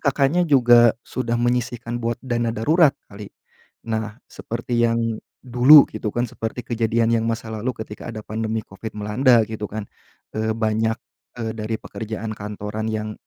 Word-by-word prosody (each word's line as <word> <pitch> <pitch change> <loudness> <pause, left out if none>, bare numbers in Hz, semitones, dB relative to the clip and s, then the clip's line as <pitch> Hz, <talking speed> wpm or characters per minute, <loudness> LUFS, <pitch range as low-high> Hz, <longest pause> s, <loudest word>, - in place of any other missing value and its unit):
Kakaknya 140 +4 +2
juga 120 -4 +6
sudah 120 -2 -2
menyisihkan 120 -1 -1
buat 115 0 -1
dana 120 -2 0
darurat 155 +6 +4 0.2
kali. 100 0 -10 0.6
Nah, 110 0 -3
seperti 120 +1 -3
yang 115 0 +2 0.4
dulu 130 +4 +8
gitu 110 - -3
kan, 120 +1 +1
seperti 115 +3 -5
kejadian 115 0 +1
yang 110 - -2
masa 115 0 -3
lalu 110 +4 -2
ketika 105 - -9
ada 110 - -6
pandemi 110 0 -3
Covid 100 +3 -8
melanda 115 +3 +3
gitu 105 -1 -4
kan. 105 0 -5 0.5
Eee, 110 0 0
banyak 110 0 0 0.4
eee, 110 -1 -3
dari 110 +1 -3
pekerjaan 110 0 -6
kantoran 105 +1 -5
yang 110 0 -3
115 Hz, 150 wpm, -22 LUFS, 110-120 Hz, 0.6 s, dulu